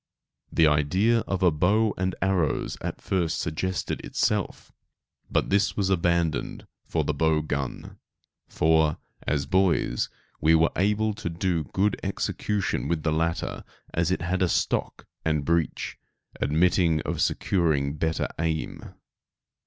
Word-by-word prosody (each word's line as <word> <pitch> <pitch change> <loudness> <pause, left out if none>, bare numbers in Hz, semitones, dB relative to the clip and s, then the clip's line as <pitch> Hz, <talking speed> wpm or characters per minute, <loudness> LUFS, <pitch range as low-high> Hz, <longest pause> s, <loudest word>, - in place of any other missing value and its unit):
The 80 - +4
idea 90 +10 +3
of 95 -1 -1
a 90 - +6
bow 100 +8 +2
and 95 0 -1
arrows 95 -5 0
at - - -4
first 85 -4 0
suggested 90 +3 -2
itself, - - -1 0.6
but - - 0
this 100 +1 +2
was 95 -2 +1
abandoned 85 -3 0 0.2
for - - 0
the - - -1
bow 80 -1 +2
gun, 70 -4 -4 0.5
for, 80 -1 +2 0.3
as 70 -2 0
boys, 90 -6 +1 0.3
we 80 +2 +5
were 80 +1 +4
able 105 +3 +1
to 105 -3 -4
do 85 -2 -1
good 95 +9 0
execution 100 +1 -1
with 80 -3 -1
the 80 - +1
latter 80 +1 -1 0.3
as 85 0 +1
it 95 - -1
had 90 +2 -1
a 90 - +3
stock - - -1 0.2
and 75 -3 0
breech, 85 0 -1 0.4
admitting 85 0 +2
of - - -3
securing 75 -6 +1
better 80 +1 -1
aim. 80 -1 -3
85 Hz, 135 wpm, -26 LUFS, 80-95 Hz, 0.6 s, a